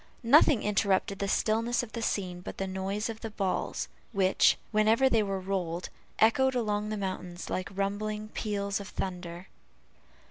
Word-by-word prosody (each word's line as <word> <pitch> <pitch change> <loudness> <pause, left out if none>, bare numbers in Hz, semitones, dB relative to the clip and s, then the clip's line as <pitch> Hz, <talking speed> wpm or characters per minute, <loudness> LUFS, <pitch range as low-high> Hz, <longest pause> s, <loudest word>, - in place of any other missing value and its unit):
Nothing 270 0 +6
interrupted 200 -1 +1
the 200 - -1
stillness 225 +4 +1
of 230 - -8
the 230 - -4
scene 185 -5 -2
but - - -8
the 195 - -1
noise 190 +2 -2
of 225 -1 -6
the 225 - -4
balls, 195 -3 -2 0.3
which, 190 -2 +4
whenever 220 +4 +4
they 225 - +4
were 195 -2 -1
rolled, 185 -2 -3 0.3
echoed 260 +4 +4
along 210 -3 0
the 215 - -2
mountains 185 -2 -5
like 185 - -2
rumbling 210 +2 -2
peals 200 -2 -2
of 200 - -7
thunder. 180 -2 -5
200 Hz, 155 wpm, -29 LUFS, 190-220 Hz, 0.3 s, Nothing